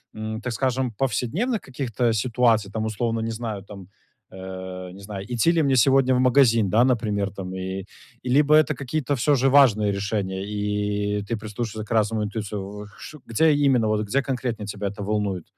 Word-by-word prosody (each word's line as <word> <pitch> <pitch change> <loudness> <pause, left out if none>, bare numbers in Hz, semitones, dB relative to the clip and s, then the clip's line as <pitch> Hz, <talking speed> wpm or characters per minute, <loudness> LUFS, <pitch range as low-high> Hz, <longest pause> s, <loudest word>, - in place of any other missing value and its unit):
м, 110 +1 -5
так 120 0 -3
скажем, 130 0 0
повседневных 140 - -1
каких-то 125 -3 -1
ситуаций? 115 -2 +2
Там 110 0 -2
условно, 115 +1 -1
не 115 0 -2
знаю 110 -3 -5
там, 100 -3 -11 0.4
э, 95 -1 -7
не 95 - -12
знаю, 100 -1 -7
идти 120 +7 +3
ли 165 -2 +2
мне 135 -1 +2
сегодня 130 +1 +4
в 125 - +2
магазин, 125 -5 +4
да, 110 +5 +4
например, 105 -6 0
там, 95 -2 -7
э, 95 +1 -4 0.4
либо 145 +4 +3
это 155 -1 +4
какие-то 140 +1 -2
всё 145 +4 +2
же 135 +1 +2
важные 110 -7 +5
решения 100 -1 -2
и 105 0 -2
ты 115 +3 -3
прислушиваешься 110 0 -5
к - - -11
разным 110 0 +1
интуициям. 105 -1 -5 0.4
Где 155 +7 +3
именно, 135 -6 +3
вот 105 0 0
где 140 +7 +1
конкретно 125 -5 -3
тебя 100 0 -4
это 100 +1 -9
волнует? 100 -4 -1
110 Hz, 175 wpm, -24 LUFS, 100-130 Hz, 0.4 s, важные